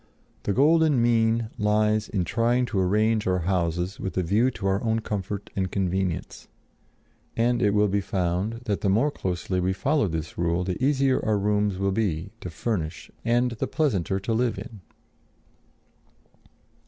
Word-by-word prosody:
The - - -1
golden 150 +3 +4
mean 115 -1 +2
lies 105 0 +2
in 95 -5 -1
trying 120 +6 +1
to 105 -5 -2
arrange 105 +3 +2
our 90 -1 +1
houses 90 +1 -1
with 95 - -5
a 90 - +2
view 105 +9 +2
to 105 -6 -7
our 95 +1 +1
own 110 -1 +1
comfort 100 -1 -4
and 95 -2 -1
convenience; 95 -2 -2 0.9
and 120 +1 +2
it 105 - +4
will 105 0 +4
be 100 +1 0
found 95 +5 -2
that 100 -4 -1
the 100 - +1
more 115 +10 +3
closely 90 -4 -2
we 90 +1 +1
follow 140 +4 +1
this 80 -2 -5
rule 85 +1 +1
the 90 +6 -3
easier 135 -1 +2
our 110 -1 +1
rooms 105 -1 +1
will 100 +1 0
be 95 -3 -1
to 90 - -5
furnish 85 -2 -3
and 120 +1 +2
the 115 - -3
pleasanter 100 - 0
to 115 +4 -1
live 120 +1 0
in. 115 -5 -8
105 Hz, 165 wpm, -25 LUFS, 95-115 Hz, 0.9 s, golden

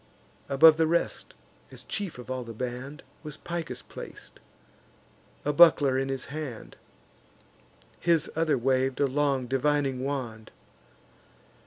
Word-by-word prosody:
Above 155 +3 +7
the 160 -1 +3
rest, 170 +1 -1 0.3
as - - -9
chief 200 -8 -4
of 125 +1 -8
all 130 -1 -3
the 115 -1 -9
band, 125 +5 -6 0.2
Was 150 -2 -9
Picus 170 -3 -5
plac'd, - - -10 1.1
a 145 - +1
buckler 145 -4 +6
in 135 +1 -1
his 135 -1 -3
hand; 150 -7 -7 1.2
His 165 -3 +2
other 160 -3 +2
wav'd 130 +1 0
a 145 - +4
long 140 -1 0
divining 135 0 0
wand. 120 -6 -4
140 Hz, 125 wpm, -27 LUFS, 130-155 Hz, 1.2 s, Above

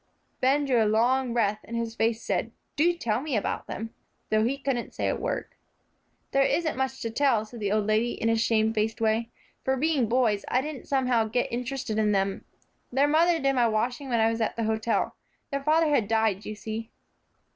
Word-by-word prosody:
Ben 280 +3 +3
drew 245 -5 +3
a - - +1
long 245 +4 +2
breath, 215 -3 +1
and 235 - -5
his 230 -1 -2
face 230 0 0
said, 200 +4 -1 0.2
"Do 330 +4 +4
tell 230 -6 -1
me 290 -3 -2
about 205 - -3
them," 225 +1 -6 0.4
though 215 0 +3
he 255 +5 0
couldn't 270 -4 -3
say - - -1
a - - +1
word. - - -3 0.8
"There 275 - +3
isn't 315 +3 +1
much 265 0 -2
to 230 - -2
tell," 240 -4 +2
said 235 +2 -11
the 205 -2 -1
old 215 -1 +1
lady 215 +3 +1
in 225 - -2
a 225 - +3
shamefaced 220 0 +1
way, 225 +1 +1 0.3
"for, 265 0 +1
being 280 -5 +1
boys, 230 -5 +2
I 255 - +2
didn't 295 -2 -7
somehow 255 -4 +2
get 240 +3 -1
interested 245 -3 -2
in 210 -1 +2
them. 195 0 -1 0.5
Their 275 +3 +3
mother 330 +3 +4
did 275 -3 +1
my 245 -3 +3
washing 245 +5 -1
when 235 -2 +1
I 225 0 +4
was 230 0 -3
at 220 - 0
the 230 - -2
hotel. 220 +1 0 0.4
Their 280 0 -1
father 310 +2 +3
had 255 -8 +2
died, 220 -2 +1
you 215 - -5
see." 220 +2 -6
235 Hz, 205 wpm, -27 LUFS, 220-265 Hz, 0.8 s, Do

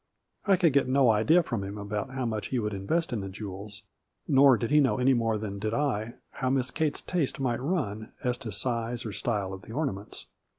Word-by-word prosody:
I 195 - +6
could 170 -5 +3
get 140 -2 +3
no 130 -2 +4
idea 155 +12 +4
from 120 -10 -3
him 100 +2 -6
about 105 +4 -3
how 130 -1 -3
much 110 -2 -2
he 130 - -1
would 105 -3 -1
invest 135 - -1
in 115 - -1
the 95 - -5
jewels, 100 +2 -8 0.4
nor 135 -2 +6
did 115 +3 -3
he 150 - +6
know 130 -7 +3
any 130 +1 +4
more 115 -3 +1
than 100 -2 -5
did 110 +2 -1
I 120 -5 -1 0.2
how 130 - -2
Miss 130 -1 +1
Kate's 155 -2 -1
taste 170 -8 -1
might 125 -3 0
run 120 - -2
as 125 0 0
to 115 -5 -6
size 115 +2 -2
or 110 - -3
style 100 -1 -2
of 95 - -8
the 110 - -11
ornaments. 120 -8 -4
120 Hz, 220 wpm, -28 LUFS, 105-135 Hz, 0.4 s, I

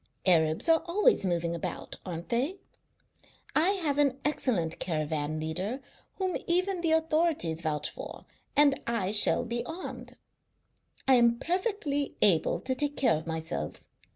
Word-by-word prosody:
Arabs 160 - +3
are 325 -1 +5
always 415 - +3
moving 170 -1 -1
about, 170 - -5
aren't 170 -2 -7
they? 265 +11 0 1.0
I 325 +4 +4
have 290 -2 0
an 280 -2 +2
excellent 210 - 0
caravan 155 -2 -2
leader, 185 - -3 0.4
whom 375 -2 -1
even 365 +1 +1
the 335 - +1
authorities 320 - +1
vouch 155 -2 -1
for, - - -9 0.3
and 285 -1 +4
I 215 -5 0
shall 215 +3 +5
be 235 0 -2
armed. 320 +8 -8 0.9
I 265 - +6
am 235 -1 +4
perfectly 340 - -2
able 170 -4 +4
to 260 - -1
take 290 +2 -2
care 260 - +3
of 155 +2 -6
myself. 160 - -5
240 Hz, 140 wpm, -29 LUFS, -, 1.0 s, I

